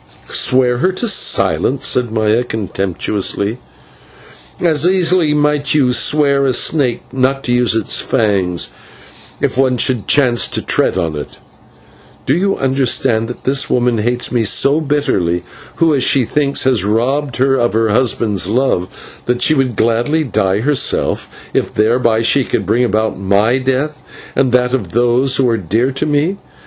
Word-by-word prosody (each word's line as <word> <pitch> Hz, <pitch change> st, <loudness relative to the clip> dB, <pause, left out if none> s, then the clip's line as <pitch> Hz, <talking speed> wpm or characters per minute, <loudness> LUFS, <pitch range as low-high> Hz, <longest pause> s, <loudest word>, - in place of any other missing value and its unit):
"Swear 125 Hz, -1 st, +2 dB
her 185 Hz, +7 st, +1 dB
to 235 Hz, +6 st, -2 dB
silence!" 135 Hz, -, +1 dB
said 125 Hz, -3 st, +1 dB
Maya 110 Hz, +1 st, +1 dB
contemptuously, 100 Hz, 0 st, -3 dB, 1.0 s
"as 160 Hz, -4 st, +1 dB
easily 180 Hz, -3 st, +2 dB
might 150 Hz, -1 st, 0 dB
you 130 Hz, -4 st, +2 dB
swear 140 Hz, +2 st, +2 dB
a 130 Hz, -, +1 dB
snake 135 Hz, -3 st, +1 dB
not 135 Hz, +1 st, 0 dB
to 120 Hz, -, -1 dB
use 125 Hz, -2 st, +1 dB
its 110 Hz, -3 st, 0 dB
fangs, 100 Hz, -7 st, 0 dB, 0.7 s
if -, -, -1 dB
one 130 Hz, -2 st, +2 dB
should 120 Hz, -2 st, 0 dB
chance 125 Hz, -5 st, +3 dB
to -, -, -2 dB
tread -, -, 0 dB
on 85 Hz, -4 st, -2 dB
it. 75 Hz, -1 st, -8 dB, 0.9 s
Do 135 Hz, -, +1 dB
you 195 Hz, +3 st, 0 dB
not -, -, -10 dB
understand 130 Hz, -3 st, +1 dB
that 120 Hz, -, -9 dB
this 135 Hz, +1 st, +1 dB
woman 120 Hz, -2 st, +1 dB
hates 120 Hz, +3 st, -1 dB
me 120 Hz, -2 st, 0 dB, 0.4 s
bitterly, 90 Hz, -12 st, -1 dB, 0.3 s
who 160 Hz, -4 st, +2 dB
she 130 Hz, 0 st, +2 dB
thinks 140 Hz, +2 st, 0 dB
has 125 Hz, -7 st, +2 dB
robbed 120 Hz, +5 st, -1 dB
her 135 Hz, +1 st, +2 dB
of 120 Hz, -3 st, 0 dB
her 110 Hz, 0 st, +1 dB
husband's 105 Hz, -4 st, 0 dB
love, 115 Hz, -6 st, 0 dB, 0.4 s
that 120 Hz, 0 st, 0 dB
she 155 Hz, -, +4 dB
would 135 Hz, -5 st, -1 dB
gladly 120 Hz, +9 st, 0 dB
die 100 Hz, -6 st, -1 dB
herself, 140 Hz, +2 st, 0 dB, 0.2 s
if -, -, -1 dB
thereby 115 Hz, +1 st, +1 dB
she 135 Hz, +4 st, +2 dB
could 110 Hz, -, -3 dB
bring 115 Hz, +6 st, +1 dB
about 110 Hz, -4 st, -1 dB
my 100 Hz, +6 st, +1 dB
death 135 Hz, +4 st, -2 dB, 0.3 s
and 130 Hz, -2 st, +1 dB
that 125 Hz, 0 st, +1 dB
of 105 Hz, -10 st, -3 dB
those 120 Hz, +3 st, +2 dB
who 130 Hz, -, +2 dB
are 115 Hz, -1 st, +1 dB
dear 110 Hz, +8 st, -1 dB
to 135 Hz, -, -3 dB
me. 155 Hz, +6 st, 0 dB
125 Hz, 155 wpm, -15 LUFS, 110-140 Hz, 1.0 s, she